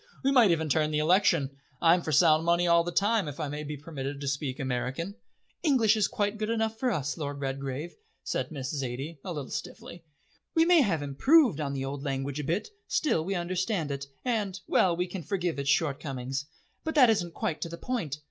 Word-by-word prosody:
We 270 Hz, -, +3 dB
might 245 Hz, -7 st, +6 dB
even 160 Hz, -2 st, +1 dB
turn 155 Hz, +1 st, +2 dB
the 150 Hz, -, -1 dB
election. 160 Hz, -3 st, +3 dB, 0.3 s
I'm 170 Hz, +1 st, +5 dB
for 160 Hz, -, -3 dB
sound 155 Hz, +1 st, +5 dB
money 170 Hz, +1 st, +3 dB
all 170 Hz, -1 st, +5 dB
the 175 Hz, -, -3 dB
time, 205 Hz, 0 st, +2 dB
if 145 Hz, +1 st, -7 dB
I 155 Hz, -, -2 dB
may 150 Hz, +1 st, -4 dB
be 150 Hz, 0 st, -5 dB
permitted 140 Hz, -2 st, -6 dB
to 140 Hz, -, -5 dB
speak 140 Hz, -1 st, -2 dB
American." 135 Hz, +7 st, -2 dB, 0.5 s
"English 245 Hz, -9 st, +4 dB
is 215 Hz, -3 st, +2 dB
quite 205 Hz, +1 st, -2 dB
good 215 Hz, 0 st, -2 dB
enough 225 Hz, -1 st, 0 dB
for 255 Hz, -, +1 dB
us, 150 Hz, -, -2 dB
Lord 145 Hz, -2 st, -4 dB
Redgrave," 135 Hz, +3 st, -4 dB, 0.3 s
said -, -, -2 dB
Miss 135 Hz, -3 st, -4 dB
Zaidie 135 Hz, +3 st, -4 dB
a 185 Hz, -, -5 dB
little 145 Hz, -5 st, -5 dB
stiffly. 170 Hz, -1 st, -7 dB, 0.5 s
"We 325 Hz, 0 st, +5 dB
may 345 Hz, -2 st, +6 dB
have 170 Hz, -, +1 dB
improved 205 Hz, -, +4 dB
on 140 Hz, -2 st, -2 dB
the 135 Hz, -1 st, -3 dB
old 135 Hz, +1 st, -5 dB
language 135 Hz, 0 st, -2 dB
a -, -, -2 dB
bit, 170 Hz, +9 st, -1 dB, 0.2 s
still 230 Hz, -, +1 dB
we 195 Hz, +3 st, -2 dB
understand 180 Hz, -2 st, -1 dB
it, 140 Hz, 0 st, -4 dB, 0.2 s
and 210 Hz, -6 st, -1 dB
well, 175 Hz, -2 st, +3 dB
we 180 Hz, -, +1 dB
can 180 Hz, 0 st, -6 dB
forgive 175 Hz, -4 st, -2 dB
its 140 Hz, 0 st, -1 dB
shortcomings. 135 Hz, -2 st, -1 dB, 0.4 s
But 320 Hz, 0 st, -3 dB
that 255 Hz, -6 st, +7 dB
isn't 175 Hz, -6 st, -1 dB
quite 155 Hz, -2 st, -2 dB
to 170 Hz, -, -3 dB
the 170 Hz, -, -7 dB
point." 170 Hz, -, -3 dB
165 Hz, 210 wpm, -28 LUFS, 140-195 Hz, 0.5 s, that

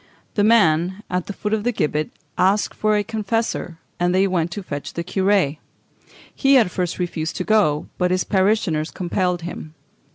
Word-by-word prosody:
The 205 Hz, -, +1 dB
man, 190 Hz, -3 st, +3 dB
at 180 Hz, -1 st, -1 dB
the -, -, -4 dB
foot 210 Hz, +2 st, -3 dB
of 215 Hz, -1 st, 0 dB
the 245 Hz, -, +1 dB
gibbet, 155 Hz, -7 st, -1 dB, 0.3 s
asked 195 Hz, +3 st, +2 dB
for 215 Hz, 0 st, +2 dB
a 205 Hz, -, +1 dB
confessor, 220 Hz, -4 st, -2 dB, 0.2 s
and 175 Hz, +1 st, +2 dB
they 190 Hz, +1 st, +4 dB
went 175 Hz, -3 st, 0 dB
to 205 Hz, -, -5 dB
fetch 145 Hz, -5 st, -6 dB
the 170 Hz, -, -3 dB
curé. 190 Hz, -4 st, +1 dB, 0.7 s
He, 275 Hz, 0 st, +4 dB
at 220 Hz, -8 st, +3 dB
first, 180 Hz, -2 st, -2 dB
refused 170 Hz, -3 st, -3 dB
to -, -, -2 dB
go, 180 Hz, -8 st, +2 dB
but 180 Hz, -1 st, +2 dB
his 185 Hz, 0 st, +1 dB
parishioners 190 Hz, -6 st, +1 dB
compelled 180 Hz, -1 st, -1 dB
him. 160 Hz, -2 st, -7 dB
185 Hz, 175 wpm, -21 LUFS, 170-210 Hz, 0.7 s, they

